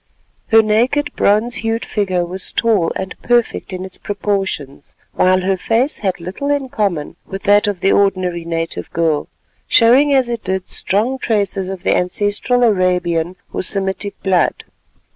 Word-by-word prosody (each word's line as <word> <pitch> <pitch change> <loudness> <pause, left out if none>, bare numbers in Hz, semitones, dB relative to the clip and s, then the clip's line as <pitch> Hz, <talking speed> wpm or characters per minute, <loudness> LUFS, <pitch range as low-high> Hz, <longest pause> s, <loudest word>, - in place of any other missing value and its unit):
Her 225 0 +6
naked 240 +7 +1
bronze 215 +4 +2
hued 225 +1 -2
figure 185 -4 -1
was 185 +2 -4
tall 215 -8 +1
and 190 -1 -4
perfect 240 -4 0
in 185 0 -5
its 190 - -9
proportions; 195 -9 -3 0.2
while 185 0 +3
her 190 +1 0
face 235 +9 +1
had 190 -4 -2
little 185 +12 -5
in 285 -2 0
common 190 -11 -2
with 195 0 -7
that 205 0 +4
of 200 -4 -2
the 195 - +3
ordinary 185 -4 +1
native 165 0 -4
girl, 160 -3 0 0.4
showing 255 +5 +5
as 265 -3 +3
it 235 -2 -4
did 190 -1 -2
strong 235 +7 0
traces 200 -5 -1
of 190 -1 -6
the - - +2
ancestral 205 +7 0
Arabian 180 -5 +1 0.2
or - - -1
Semitic 195 +1 -2
blood. 185 -4 +1
195 Hz, 155 wpm, -17 LUFS, 180-225 Hz, 0.4 s, Her